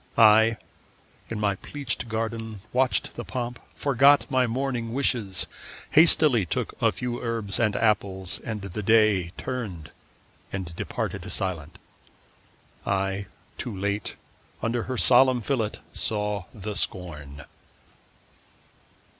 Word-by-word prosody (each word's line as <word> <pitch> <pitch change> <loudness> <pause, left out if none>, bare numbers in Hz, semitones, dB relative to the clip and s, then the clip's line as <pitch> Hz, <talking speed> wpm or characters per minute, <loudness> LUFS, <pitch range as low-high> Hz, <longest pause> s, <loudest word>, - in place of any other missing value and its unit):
I, 110 0 +7 0.7
in 115 - -3
my 100 -2 +1
pleached 135 -3 -3
garden, 110 -1 -3
watched 130 0 +1
the - - -6
pomp, 120 -2 -4 0.2
Forgot 140 +1 +5
my 130 -2 +3
morning 120 -1 -2
wishes, 110 -9 0 0.5
hastily 150 - +6
Took 85 - -2
a - - +4
few 120 -1 -4
herbs 115 -5 -2
and 110 -3 +2
apples, 95 -4 0
and 110 -4 -4
the 100 +2 -4
Day 105 -4 +4
Turned 95 -12 -5 0.6
and 90 -3 -5
departed - - -4
silent. 90 -7 -3 1.1
I, 95 0 -1 0.3
too 110 -5 -4
late, 100 +2 -2 0.5
Under 115 0 0
her 130 - -1
solemn 130 +1 +5
fillet 110 -3 0 0.2
saw 105 -3 0
the 105 0 -6
scorn. 75 -8 -3
110 Hz, 115 wpm, -26 LUFS, 100-120 Hz, 1.1 s, I